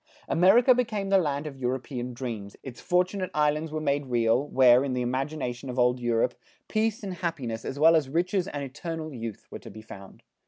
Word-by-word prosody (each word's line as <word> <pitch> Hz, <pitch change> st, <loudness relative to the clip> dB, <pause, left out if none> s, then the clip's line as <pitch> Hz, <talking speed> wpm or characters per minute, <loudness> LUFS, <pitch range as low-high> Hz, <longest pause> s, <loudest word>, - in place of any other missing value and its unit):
America 220 Hz, +9 st, +5 dB
became 215 Hz, -5 st, -1 dB
the 195 Hz, 0 st, +5 dB
land 145 Hz, -3 st, -1 dB
of 150 Hz, -3 st, -6 dB
European 125 Hz, 0 st, -3 dB
dreams, 115 Hz, -5 st, -6 dB
its 125 Hz, -3 st, -9 dB
Fortunate 185 Hz, +1 st, 0 dB
Islands 150 Hz, +1 st, +1 dB
were 155 Hz, -, -2 dB
made 145 Hz, -2 st, -1 dB
real, 120 Hz, +2 st, +1 dB
where, 130 Hz, -2 st, +5 dB
in 135 Hz, -2 st, -2 dB
the 125 Hz, -1 st, -1 dB
imagination 130 Hz, 0 st, -3 dB
of 125 Hz, -, -5 dB
old 125 Hz, 0 st, +3 dB
Europe, 120 Hz, 0 st, +1 dB, 0.3 s
peace 220 Hz, 0 st, -1 dB
and 195 Hz, -2 st, -4 dB
happiness, 140 Hz, -11 st, -4 dB
as 135 Hz, -, -5 dB
well 160 Hz, +3 st, +6 dB
as 150 Hz, -4 st, +1 dB
riches 180 Hz, +4 st, 0 dB
and 145 Hz, -5 st, -5 dB
eternal 155 Hz, +3 st, -6 dB
youth, 115 Hz, -4 st, -7 dB
were -, -, -7 dB
to -, -, -11 dB
be 110 Hz, -, -11 dB
found. 100 Hz, -3 st, -12 dB
140 Hz, 195 wpm, -27 LUFS, 125-170 Hz, 0.3 s, well